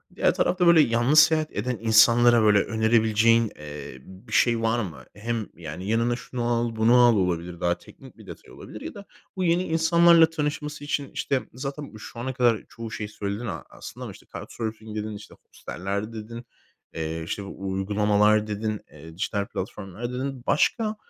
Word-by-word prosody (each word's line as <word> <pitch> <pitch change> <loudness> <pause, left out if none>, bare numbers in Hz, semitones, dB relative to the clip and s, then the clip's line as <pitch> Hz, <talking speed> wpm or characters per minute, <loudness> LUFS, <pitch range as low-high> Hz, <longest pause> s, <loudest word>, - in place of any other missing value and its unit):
diğer - - +2
tarafta 180 -1 +1
böyle 170 -2 +7
yalnız 120 +5 +4
seyahat 155 -1 +4
eden 120 +4 -2
insanlara, 115 +1 +5
böyle, 105 -1 +5
önerebileceğin, 110 0 +2
eee, 75 -3 -9
bir 95 - -15
şey 115 -2 +3
var 115 +1 +1
mı? 90 -7 -6
Hem 110 +1 -3
yani 85 +4 -7
"Yanına 115 +2 +1
şunu 120 0 -6
al, 120 -1 0
bunu 110 +2 +4
al." 120 -2 +6
olabilir. 90 -2 -1
Daha 85 0 0
teknik - - -16
bir - - -15
detay - - -12
olabilir. - - -11
Ya - - -7
da 200 0 -11 0.3
bu 185 - -2
yeni 170 +1 +2
insanlarla 165 0 +5
tanışması 150 -1 -4
için, 145 -1 -3
işte, 145 -4 -1
zaten 140 +1 -6
şu 115 +2 -10
ana 130 +2 -3
kadar 120 -3 +2
çoğu 115 -1 -8
şeyi 105 -1 -5
söyledin 105 +2 -5
a 105 - -5
aslında - - -10
ama, - - -6
işte, - - -17
card - - -7
surfing 110 -1 -6
dedin, 105 0 -4
işte, 105 - -12
hosteller 100 +5 -5
dedin, 115 +2 -8 0.5
eee, 80 0 -4
işte, 95 +5 -4
uygulamalar 105 +2 +1
dedin, 105 0 -3
eee, 80 +2 -12
dijital 100 +1 -1
platformlar 105 +3 -6
dedin. 130 0 -4
Başka, 215 +8 +1
115 Hz, 175 wpm, -25 LUFS, 105-130 Hz, 0.5 s, böyle